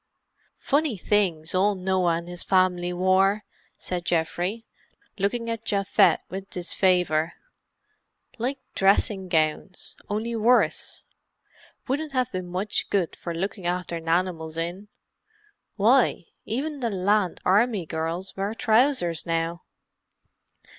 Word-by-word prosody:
"Funny 285 -5 0
things 175 -5 0
ole 200 +2 +3
Noah 185 -2 +1
and 170 +1 -5
his 175 0 -5
fam'ly 180 -2 +2
wore," 190 +3 +2 0.3
said 180 -1 -4
Geoffrey, 175 +6 -1 0.5
looking 230 +4 -1
at 230 -1 -3
Japhet 200 -3 +3
with 195 +1 -7
disfavour. 180 -3 +1 1.1
"Like 260 +4 -1 0.2
dressing 195 -1 +2
gowns, 160 +3 -1
only 220 +3 -2
worse. 235 +3 +2 0.8
Wouldn't 290 +2 -2
have 255 -2 0
been 185 -1 -4
much 185 +4 -2
good 190 -5 0
for 170 -1 -6
looking 190 +1 -3
after 175 -1 -2
nanimals 165 -1 -1
in. 175 +5 -4 0.9
Why, - - +3 0.2
even 285 +6 -3
the 240 -3 -1
Land 200 -1 +1
Army 205 0 +3
girls 165 +4 -4
wear 200 +3 -2
trousers 220 - +2
now!" 165 +1 -1
185 Hz, 115 wpm, -25 LUFS, 175-215 Hz, 1.1 s, ole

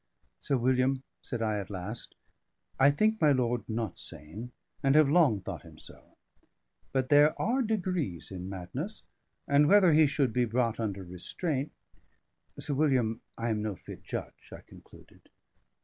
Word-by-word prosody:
"Sir 140 - 0
William," 130 +2 +2 0.2
said 115 -2 -4
I 105 -2 0
at 95 - -6
last, 100 +3 -5 0.6
"I 135 +1 +7
think 215 +9 +2
my 150 -2 +6
lord 120 -3 0
not 110 -4 -3
sane, 100 - -8 0.3
and 135 0 +3
have 155 -2 +7
long 140 - +4
thought 95 -2 -6
him 80 -2 -15
so. - - -14 0.7
But 130 -1 0
there 145 +1 +5
are 245 +6 +1
degrees 180 - -2
in 90 0 -6
madness; 90 -2 -5 0.4
and 145 +1 +5
whether 195 -2 +6
he 155 0 +6
should 135 -4 0
be 125 -1 +2
brought 115 0 0
under 100 -4 -3
restraint 130 - -3 0.9
Sir 145 - -2
William, 130 -6 +1 0.2
I 115 +1 -2
am 105 -1 -1
no 105 -2 -2
fit - - -11
judge," - - -7
I - - -9
concluded. - - -18
125 Hz, 155 wpm, -30 LUFS, 105-145 Hz, 0.9 s, I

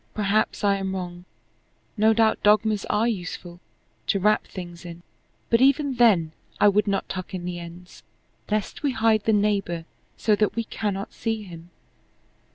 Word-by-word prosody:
Perhaps 210 +1 0
I 200 -1 +3
am 190 -1 -3
wrong. 175 -1 -6 0.7
No 220 0 +4
doubt 220 0 +2
dogmas 210 0 +3
are 215 +3 +1
useful 175 -4 -5 0.5
to 200 - +1
wrap 210 +3 +2
things 175 -2 -9
in 170 -1 -10 0.5
but 230 +1 +4
even 275 +1 +3
then 195 -10 +4 0.3
I 205 - +6
would 205 +1 +2
not 200 -1 -1
tuck 185 0 -5
in 175 -1 -5
the 175 -1 -4
ends, 170 +1 -11 0.5
lest 215 -1 -2
we 285 -3 0
hide 225 -3 +2
the 225 - +3
neighbor 200 -5 0 0.3
so 215 -2 +2
that 210 -1 +1
we 230 - -1
cannot 205 -3 -4
see 225 -1 -3
him. 170 -3 -11
205 Hz, 165 wpm, -24 LUFS, 180-220 Hz, 0.7 s, I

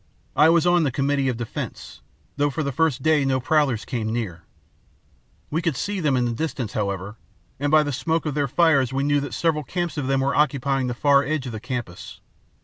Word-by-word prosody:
I 155 +2 +6
was 170 0 +4
on 175 0 +4
the 150 - +2
committee 140 +1 0
of 125 - -2
defence, 120 -2 -6 0.3
though 145 +1 +1
for 155 +3 -3
the 140 - -2
first 140 -2 0
day 155 -2 +3
no 135 -1 +1
prowlers 135 -4 +1
came 110 -3 -3
near. 105 -8 -3 1.1
We 160 +3 0
could 165 -5 -1
see 200 +8 -3
them 145 -6 +1
in 125 - +1
the 120 - -1
distance, 135 -3 -3
however, 100 0 -3 0.4
and 145 +1 0
by 155 +1 +5
the 145 - -3
smoke 160 +6 -1
of 150 - -1
their 145 -1 0
fires 140 -3 +3
knew 140 +2 +1
that 140 -3 -5
several 160 -3 0
camps 170 +2 -3
of 135 - -3
them 135 0 +1
were 140 +1 +1
occupying 135 -2 +1
the 125 - -3
far 140 +1 +4
edge 145 -1 -2
of 125 - -5
the 110 - -6
campus. 120 -7 -6
140 Hz, 215 wpm, -23 LUFS, 125-155 Hz, 1.1 s, I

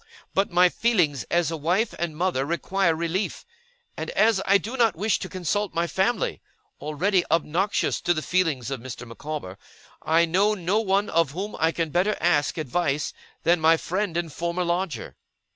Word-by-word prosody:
But 195 +1 +1
my 180 +1 +5
feelings 175 - +1
as 170 -1 +1
a - - -2
wife 180 +9 0
and 165 -3 -3
mother 175 -6 0
require 170 +3 0
relief; 170 +5 -2 0.5
and - - -5
as 225 - +3
I 200 +1 +6
do 225 +5 -6
not 235 -4 +3
wish 210 +6 0
to - - -6
consult 190 +2 -2
my 170 +1 +1
family 190 +7 0 0.4
(already 175 +5 +1
obnoxious 165 +5 +1
to 175 - +2
the 155 - -3
feelings 160 -9 0
of 135 - -3
Mr. 120 0 -8
Micawber), 115 -5 -7 0.4
I 165 +2 +3
know 195 +6 +2
no 190 +3 0
one 200 -1 +1
of 165 -4 +1
whom 200 +5 -4
I 160 +1 +3
can 165 -2 -2
better 185 +6 +1
ask 155 -4 +2
advice 150 0 -1 0.3
than 170 0 +3
my 160 +1 +5
friend 185 +1 -2
and 170 -4 -3
former 170 +1 -2
lodger. 175 0 -3
170 Hz, 175 wpm, -25 LUFS, 160-195 Hz, 0.5 s, I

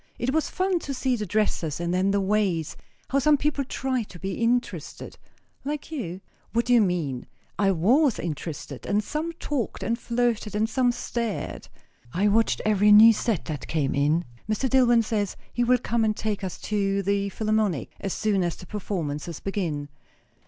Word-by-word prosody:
It 255 +3 -1
was 315 0 +1
fun 370 -1 0
to 280 -4 -5
see 255 0 +1
the 210 -3 -4
dresses; 175 -6 0
and 170 0 -1
then 185 +2 +2
the 200 0 +2
ways. 195 -5 0 0.4
How 275 - +3
some 295 +2 +4
people 285 0 0
tried 260 -3 -2
to 175 - -11
be 190 +2 -4
interested 240 +3 -2 0.2
" - - -40
"Like 295 +2 -4
you?" 195 - -4 0.3
"What 235 +1 +2
do 245 - +3
you 240 - +7
mean? 165 -10 -1 0.3
I 200 -1 +4
was 235 - +3
interested; 150 -4 -5
and 210 +1 +1
some 310 +8 -3
talked 290 -7 -3
and 235 +1 -1
flirted, 235 -3 -1
and 215 +1 +2
some 245 +1 +2
stared. 235 -2 -4 0.5
I 200 +4 +2
watched 225 +2 +2
every 210 -1 +4
new 220 +2 +9
set 215 -5 -1
that 150 -4 -5
came 150 -4 0
in. 150 +5 +2 0.2
Mr. 215 +5 +1
DilIwyn 240 -3 +4
says 210 -3 -1 0.2
he 240 - +1
will 250 +1 +4
come 235 -1 0
and 215 -1 +1
take 210 -2 -2
us 185 - -4
to 200 -2 0
the 200 +1 0
Philarmonic, 215 - 0
as 195 - -3
soon 205 -1 +1
as 175 -1 -1
the 180 - -12
performances 170 -6 -4
begin." 165 -8 -3
210 Hz, 180 wpm, -25 LUFS, 185-240 Hz, 0.5 s, new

